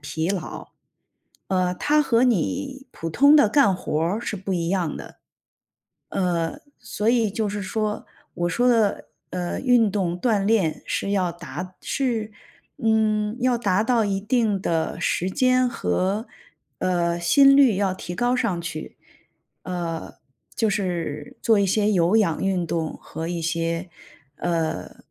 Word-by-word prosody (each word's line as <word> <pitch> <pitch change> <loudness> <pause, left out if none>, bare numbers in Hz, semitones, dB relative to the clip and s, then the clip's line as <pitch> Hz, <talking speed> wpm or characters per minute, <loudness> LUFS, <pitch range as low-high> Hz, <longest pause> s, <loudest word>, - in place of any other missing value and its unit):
疲 155 +3 -3
劳。 195 -3 -5 0.8
呃， 185 -1 +1
它 300 +10 +2
和 240 -3 +3
你 270 - -1
普 165 - -6
通 285 - +6
的 260 -8 +5
干 220 -6 +4
活 155 -4 -2
儿 175 +6 0
是 215 - -4
不 190 0 -3
一 170 -2 -1
样 180 -5 -1
的。 - - -11 0.9
呃， 170 -3 -1 0.2
所 210 - -4
以 230 -3 +2
就 210 +1 -2
是 205 0 -4
说， 210 +2 -2 0.3
我 175 0 -1
说 245 +8 +2
的， 225 -4 +1 0.2
呃， 180 -1 -3
运 245 -5 +3
动 180 -3 -1
锻 205 -2 +1
炼 205 -8 +1
是 200 - -2
要 185 -3 +1
达 180 +3 -8
是， 230 -5 -2 0.5
嗯， 220 -3 +1
要 250 -1 +2
达 205 -3 +1
到 230 -1 +2
一 195 -1 -1
定 215 -2 +1
的 165 -3 -1
时 180 - 0
间 255 +4 +3
和， 195 - -1 0.5
呃， 175 -2 0
心 275 +10 +6
率 265 -7 +6
要 195 -1 0
提 175 -1 -7
高 245 +5 +1
上 215 -9 -1
去。 155 -2 -6 0.7
呃， 170 -3 -4 0.4
就 225 -3 +1
是 170 -7 -3
做 220 -3 +4
一 200 - +3
些 210 +2 +2
有 180 +1 +3
氧 180 -8 +1
运 190 -2 0
动 160 0 -2
和 160 +1 -6
一 170 -1 -3
些， 165 +2 -2 1.0
呃 - - -16
195 Hz, 160 characters per minute, -23 LUFS, 175-225 Hz, 1.0 s, 通